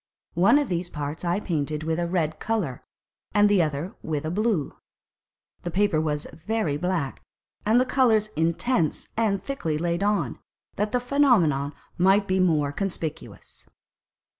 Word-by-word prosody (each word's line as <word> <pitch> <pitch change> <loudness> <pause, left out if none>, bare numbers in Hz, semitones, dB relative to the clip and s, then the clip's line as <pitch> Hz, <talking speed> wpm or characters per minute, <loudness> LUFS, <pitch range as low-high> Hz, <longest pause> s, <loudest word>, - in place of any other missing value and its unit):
One 185 +11 +5
of 290 -2 +1
these 175 -2 -2
parts 150 +1 -5
I 175 +2 +1
painted 155 -5 -2
with 160 +1 -1
a 170 - 0
red 165 -3 -1
colour 200 - -2 0.5
and 205 0 +6
the 205 -3 +4
other 155 +5 -2
with 155 -2 -3
a 155 - -2
blue. 205 - 0 0.9
The 175 - -4
Paper 185 -3 +2
was 150 -2 -1
very 170 0 -1
black, 170 -3 -2 0.5
and 225 +3 +5
the 255 - +3
Colours 235 -5 +3
intense 170 +1 0
and 205 -4 +1
thickly 170 - -2
laid 170 +2 -1
on, 200 - 0 0.4
that 210 +1 -1
the - - +2
Phænomenon 230 - +2 0.3
might 195 +3 +4
be 185 0 +1
more 155 -6 +2
conspicuous. 170 -2 -5
175 Hz, 150 wpm, -25 LUFS, 155-210 Hz, 0.9 s, and